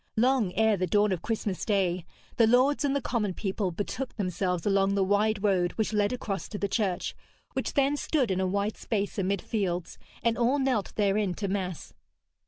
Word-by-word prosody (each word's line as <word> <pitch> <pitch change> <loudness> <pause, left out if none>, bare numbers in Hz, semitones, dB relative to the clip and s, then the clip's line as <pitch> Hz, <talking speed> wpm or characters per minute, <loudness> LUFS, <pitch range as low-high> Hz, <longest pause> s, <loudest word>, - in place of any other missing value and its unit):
Long 240 -4 +3
ere 220 -1 +3
the 185 0 0
dawn 205 +3 +3
of 180 -3 -1
Christmas 210 -3 -2
Day, 185 -4 0 0.3
the 230 -3 +5
lords 255 +6 +4
and 280 -1 +1
the 280 - -1
common 210 -6 -1
people 195 -1 -1
betook 210 +8 -4
themselves 180 -3 -1
along 195 -1 +2
the 195 - +3
wide 205 +1 +1
road 185 -4 +2
which 220 0 -1
led 205 -1 +2
across 200 -7 -3
to 210 - -5
the 200 - -1
church, 190 -3 -1 0.4
which - - -2
then 280 0 +3
stood 285 -6 0
in 190 0 0
a 190 - +1
wide 200 +3 -1
space 205 -2 -2
amid 195 0 0
fields, 180 -5 -2 0.2
and 230 0 +1
all 245 +4 +3
knelt 260 -7 0
therein 200 -2 +1
to 200 - -3
mass. 185 -3 -3
205 Hz, 190 wpm, -28 LUFS, 190-225 Hz, 0.4 s, the